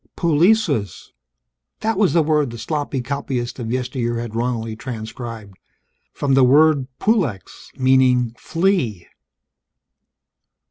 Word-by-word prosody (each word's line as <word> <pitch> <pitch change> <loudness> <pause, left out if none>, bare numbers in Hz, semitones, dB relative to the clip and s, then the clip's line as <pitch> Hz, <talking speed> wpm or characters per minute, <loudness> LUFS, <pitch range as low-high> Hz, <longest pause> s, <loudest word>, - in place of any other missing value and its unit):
Pulicus! 165 - +1 0.7
That 225 +1 0
was 200 -2 +2
the 165 -2 +4
word 150 -3 +1
the 115 - -8
sloppy 145 -1 -3
copyist 130 -2 -4
of 115 -2 -4
yesteryear 125 -2 -2
had 115 -2 -5
wrongly 115 -1 -2
transcribed. 110 -3 -8 0.5
From 140 -2 -1
the 135 0 +5
word 145 +1 +4
pulex, 165 - -1
meaning 130 -2 +3
"flea." 165 - -1
130 Hz, 105 wpm, -20 LUFS, 115-155 Hz, 0.7 s, the